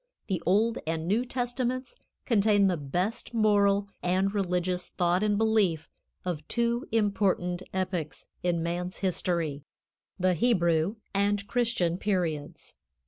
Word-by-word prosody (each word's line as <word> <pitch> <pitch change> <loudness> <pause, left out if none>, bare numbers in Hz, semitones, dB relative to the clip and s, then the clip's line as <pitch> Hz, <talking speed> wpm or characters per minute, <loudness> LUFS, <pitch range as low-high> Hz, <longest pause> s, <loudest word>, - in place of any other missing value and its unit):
The 185 -5 -2
Old 220 +5 +3
and 165 0 -2
New 215 +6 +2
Testaments 250 - -2 0.3
contain 205 -3 +4
the 185 -2 +3
best 180 - -3
moral 205 -2 +3
and 190 +2 +1
religious 180 -2 -1
thought 175 +1 +1
and 210 -1 +2
belief 210 -8 +1 0.3
of 155 -4 -3
two 235 0 0
important 200 -5 +1
epochs 185 -4 -3 0.2
in 170 -2 0
man's 175 +2 -3
history 165 -5 -1 0.6
the 185 0 +3
Hebrew 170 -2 +2 0.2
and 200 0 +1
Christian 215 -7 0
periods. 170 -8 -2
190 Hz, 120 wpm, -28 LUFS, 175-215 Hz, 0.6 s, contain